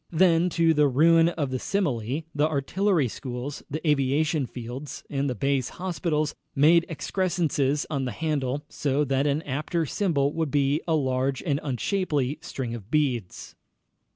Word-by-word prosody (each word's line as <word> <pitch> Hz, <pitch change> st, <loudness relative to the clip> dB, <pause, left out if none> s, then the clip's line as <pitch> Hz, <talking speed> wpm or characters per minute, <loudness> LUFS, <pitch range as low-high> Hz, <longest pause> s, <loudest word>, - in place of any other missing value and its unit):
Then, 170 Hz, 0 st, +4 dB
to 165 Hz, -1 st, +4 dB
the 150 Hz, -1 st, +4 dB
ruin 165 Hz, +5 st, +5 dB
of 145 Hz, -6 st, -3 dB
the 130 Hz, -, -2 dB
simile, 145 Hz, -, -1 dB
the 150 Hz, +1 st, +2 dB
artillery 160 Hz, +2 st, +1 dB
schools, 125 Hz, +3 st, -6 dB
the 155 Hz, +3 st, -4 dB
aviation 145 Hz, 0 st, +2 dB
fields, 125 Hz, +5 st, -7 dB
and 140 Hz, 0 st, 0 dB
the 125 Hz, -, -2 dB
base 135 Hz, -2 st, 0 dB
hospitals 170 Hz, -4 st, -2 dB, 0.2 s
made 165 Hz, +4 st, +5 dB
excrescences 155 Hz, -5 st, 0 dB
on 140 Hz, -4 st, -2 dB
the 125 Hz, -, -2 dB
handle, 145 Hz, 0 st, -2 dB
so 145 Hz, 0 st, 0 dB
that 135 Hz, +1 st, +1 dB
an 145 Hz, +3 st, 0 dB
apter 155 Hz, +4 st, -2 dB
symbol 145 Hz, -4 st, 0 dB
would 160 Hz, -2 st, -1 dB
be 145 Hz, +2 st, +1 dB
a 165 Hz, -, +2 dB
large 130 Hz, -2 st, 0 dB
and 145 Hz, -4 st, 0 dB
unshapely 145 Hz, -, -1 dB
string 125 Hz, -4 st, -5 dB
of 110 Hz, -3 st, -8 dB
beads. 130 Hz, -10 st, -1 dB
145 Hz, 155 wpm, -26 LUFS, 135-165 Hz, 0.2 s, ruin